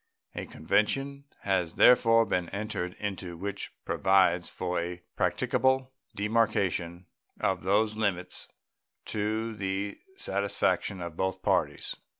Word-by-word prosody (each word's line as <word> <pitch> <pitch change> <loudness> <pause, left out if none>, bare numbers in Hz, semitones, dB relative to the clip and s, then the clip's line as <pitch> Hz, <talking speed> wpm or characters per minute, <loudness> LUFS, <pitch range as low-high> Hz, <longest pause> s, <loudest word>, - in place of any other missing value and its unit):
A - - -5
convention 135 - 0 0.2
has 95 -4 0
therefore 115 -2 +6
been 90 -5 -1
entered 100 -3 -3
into 95 -4 -5
which 100 +2 -4
provides 95 -2 +3
for 90 -1 -2
a 85 +1 -5
practicable 130 0 +1 0.2
demarcation 100 -5 0 0.3
of - - 0
those 105 +3 +2
limits 90 -4 -2 0.6
to 110 +2 -2
the 100 0 -3 0.2
satisfaction 100 -1 0
of 85 -2 -6
both 95 +1 -2
parties. - - 0
100 Hz, 110 wpm, -29 LUFS, 90-110 Hz, 0.6 s, therefore